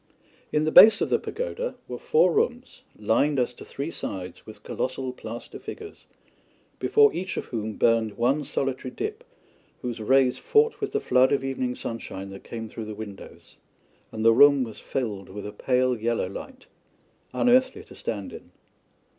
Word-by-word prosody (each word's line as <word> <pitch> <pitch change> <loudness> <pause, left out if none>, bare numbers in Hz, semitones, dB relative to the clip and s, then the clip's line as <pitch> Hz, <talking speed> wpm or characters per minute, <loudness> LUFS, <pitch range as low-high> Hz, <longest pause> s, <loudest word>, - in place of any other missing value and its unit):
In 150 - +1
the 155 - 0
base 215 +5 +9
of - - 0
the - - +3
pagoda - - -4
were - - -6
four 485 -1 +3
rooms, 450 +2 -1 0.2
lined 145 0 +1
as 125 0 0
to - - -12
three 145 +4 -5
sides 95 - -6
with 110 -1 -12
colossal 130 0 -3
plaster 115 -1 -8
figures, 425 -1 -10 0.7
before 435 -1 +4
each 185 +1 -4
of - - -3
whom 110 -2 -4
burned 115 -1 +1
one 135 +6 +1
solitary 135 -2 -3
dip 430 - -5 0.6
whose 120 -2 -4
rays 130 +3 +3
fought 450 +1 +2
with 410 -1 -3
the 430 - +1
flood 130 - +3
of 140 - +1
evening 130 -2 -2
sunshine 100 -4 -6
that 95 - -10
came 115 -1 -6
through 110 0 -7
the 105 0 -7
windows, 105 -2 -11 0.5
and 110 0 -4
the 115 - +7
room 140 +2 +6
was 115 -3 -8
filled 105 -7 -4
with 100 +2 -8
a 105 - -5
pale 125 +3 +1
yellow 115 -3 -1
light 260 - -9 0.7
unearthly 260 +12 +2
to - - -15
stand - - -5
in. - - -11
130 Hz, 170 wpm, -25 LUFS, -, 0.7 s, base